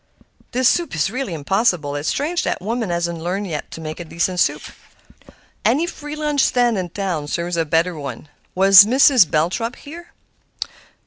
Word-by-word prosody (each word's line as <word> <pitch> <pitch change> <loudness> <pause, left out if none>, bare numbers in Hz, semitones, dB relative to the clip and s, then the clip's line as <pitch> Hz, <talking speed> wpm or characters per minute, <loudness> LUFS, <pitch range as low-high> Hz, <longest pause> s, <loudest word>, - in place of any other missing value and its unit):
"This 255 0 +2
soup 345 - +1
is 165 +5 0
really 255 -8 -4
impossible; 165 -2 0
it's 145 +2 -2
strange 330 +5 -1
that - - -2
woman 225 +2 -3
hasn't 170 -1 -2
learned 185 +4 -3
yet 155 -6 -5
to 165 - -9
make 155 +1 -6
a - - -5
decent 170 +2 -2
soup. - - +1 1.0
Any 280 +9 +2
free 300 -3 -7
lunch 300 -2 0
stand 245 -3 +2
in 180 -1 -4
town 175 -5 -3
serves 170 +3 -3
a 165 -1 0
better 165 +3 +1
one. 140 0 -7 0.3
Was 195 +1 +8
Mrs. 250 - +5
Belthrop 185 +10 -1
here?" 335 +4 -12
190 Hz, 170 wpm, -20 LUFS, 165-250 Hz, 1.0 s, Was